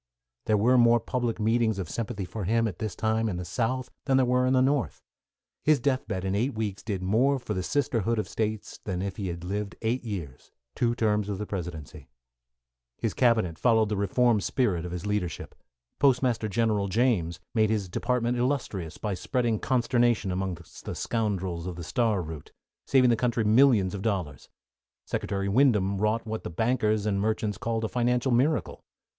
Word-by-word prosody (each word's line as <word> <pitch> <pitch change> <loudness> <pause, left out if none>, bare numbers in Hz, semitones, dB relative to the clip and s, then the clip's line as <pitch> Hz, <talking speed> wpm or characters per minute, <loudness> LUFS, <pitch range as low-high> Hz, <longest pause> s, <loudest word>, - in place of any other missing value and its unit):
There 110 - +3
were 125 +5 +4
more 120 0 +5
public 120 -1 -2
meetings 110 -1 +2
of 95 -4 -3
sympathy 105 +1 -4
for 105 +1 -5
him, 115 +3 +2
at 95 -5 -6
this 110 -4 -3
time, 110 0 0
in 90 - -3
the 90 - -5
South 125 +7 -2
than 135 -2 +3
there 130 - +4
were 125 +1 +2
in 130 - +2
the 130 - +4
North. 135 -1 0 0.6
His 155 -1 +4
death 130 +1 0
bed 95 -3 -3
in 95 - 0
eight 120 +6 0
weeks 105 -3 -3
did 100 -4 -4
more 125 +9 +3
for 120 -4 -4
the 95 - -2
sisterhood 115 -1 0
of 110 - -1
States 110 -1 -3
than 95 -2 -3
if 100 -1 -4
he 100 - -3
had 85 -1 -5
lived 100 +1 -3
eight 120 +3 0
years 90 - -6 0.2
two 120 -1 0
terms 105 -3 +1
of 100 - -2
the 105 - -4
Presidency. 80 -7 -6 0.9
His - - -2
cabinet 110 -10 +2
followed 110 -3 +3
the 105 - 0
reform 105 +3 +2
spirit 95 -8 0
of 90 - -5
his 90 +2 -5
leadership. 105 -6 -3 0.5
Postmaster 125 -5 +2
General 105 -1 +1
James 95 -6 +1
made 110 -3 +3
his 105 -3 0
department 120 +5 -1
illustrious 120 - -2
by 105 -2 -3
spreading 115 +2 -1
consternation 120 -5 +1
among 95 0 -2
the 85 0 -9
scoundrels 95 -6 -2
of 90 - -5
the 85 - -7
Star 110 0 0
Route, 80 -2 -8 0.4
saving 130 -3 +5
the - - +4
country 115 0 0
millions 110 -4 +4
of 100 - -4
dollars. 90 - -3 0.6
Secretary 100 -1 -2
Windom 100 -4 +3
wrought 110 +2 0
what 110 0 -4
the - - -4
bankers 110 +2 +1
and 100 -2 0
merchants 110 -2 -1
called 115 -1 -2
a - - +1
financial 125 +2 +1
miracle. 135 +6 +1
110 Hz, 185 wpm, -27 LUFS, 95-120 Hz, 0.9 s, more